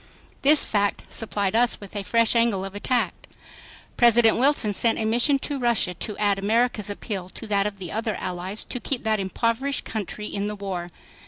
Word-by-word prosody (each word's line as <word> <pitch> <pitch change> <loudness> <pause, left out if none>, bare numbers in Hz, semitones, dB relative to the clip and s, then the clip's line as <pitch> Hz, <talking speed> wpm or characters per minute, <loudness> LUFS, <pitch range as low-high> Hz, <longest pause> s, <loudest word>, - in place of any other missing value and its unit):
This 295 +2 +6
fact 205 -1 0
supplied 205 -3 0
us 240 +1 +3
with 200 0 -12
a 205 - -2
fresh 230 +4 +2
angle 230 -5 +2
of 195 - -7
attack. 240 +4 0 0.8
President 235 -2 +5
Wilson 250 -5 +2
sent 230 +3 +2
a 220 - -1
Mission 240 +6 +3
to 280 +1 -4
Russia 235 -7 +1
to 205 +4 -5
add 205 -1 +1
America's 220 0 +1
appeal 200 -2 -5
to 225 - -7
that 200 -1 +1
of 205 -1 -6
the 180 -3 -7
other 220 0 -2
Allies 185 +4 -4
to 250 - -4
keep 255 0 -3
that 220 -1 +1
impoverished 230 +8 -1
country 210 -1 -5
in 200 -1 -3
the 210 - -4
war. 190 -4 -5
215 Hz, 185 wpm, -24 LUFS, 200-235 Hz, 0.8 s, This